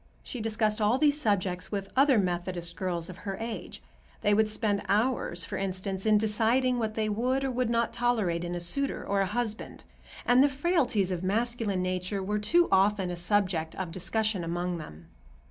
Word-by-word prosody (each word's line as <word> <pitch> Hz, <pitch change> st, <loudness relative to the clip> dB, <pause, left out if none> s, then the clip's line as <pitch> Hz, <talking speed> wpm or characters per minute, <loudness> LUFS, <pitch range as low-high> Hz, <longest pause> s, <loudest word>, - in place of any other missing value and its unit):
She 250 Hz, -, -6 dB
discussed 215 Hz, 0 st, 0 dB
all 215 Hz, +4 st, +3 dB
these 295 Hz, +1 st, +2 dB
subjects 185 Hz, -5 st, 0 dB
with 195 Hz, -2 st, -4 dB
other 270 Hz, -1 st, +5 dB
Methodist 175 Hz, -2 st, -2 dB
girls 175 Hz, -3 st, -2 dB
of 185 Hz, -, -9 dB
her 195 Hz, -2 st, -5 dB
age. 225 Hz, 0 st, -6 dB, 0.4 s
They 205 Hz, -1 st, +3 dB
would 215 Hz, +1 st, +3 dB
spend 210 Hz, -2 st, 0 dB
hours, 205 Hz, -5 st, +1 dB
for -, -, -5 dB
instance, 190 Hz, +1 st, -3 dB
in 215 Hz, -1 st, +5 dB
deciding 230 Hz, +4 st, +2 dB
what 220 Hz, -1 st, -2 dB
they 220 Hz, -1 st, 0 dB
would 250 Hz, +6 st, 0 dB
or 270 Hz, -, 0 dB
would 250 Hz, -1 st, 0 dB
not 235 Hz, 0 st, +1 dB
tolerate 225 Hz, -8 st, 0 dB
in 175 Hz, 0 st, -3 dB
a -, -, -2 dB
suitor 275 Hz, +11 st, -1 dB
or 200 Hz, 0 st, +1 dB
a 195 Hz, -, +1 dB
husband, 220 Hz, +1 st, -3 dB, 0.4 s
and 245 Hz, +2 st, +6 dB
the 285 Hz, -, +4 dB
frailties 270 Hz, -, +1 dB
of 180 Hz, -2 st, -2 dB
masculine 215 Hz, -1 st, -1 dB
nature 185 Hz, +2 st, -2 dB
were 210 Hz, +2 st, -1 dB
too 340 Hz, +11 st, +3 dB
often 195 Hz, -1 st, +3 dB
a -, -, -3 dB
subject 175 Hz, -3 st, 0 dB
of 185 Hz, -3 st, -4 dB
discussion 195 Hz, +2 st, 0 dB
among 175 Hz, +1 st, -2 dB
them. 80 Hz, -, -10 dB
210 Hz, 185 wpm, -28 LUFS, 185-235 Hz, 0.4 s, and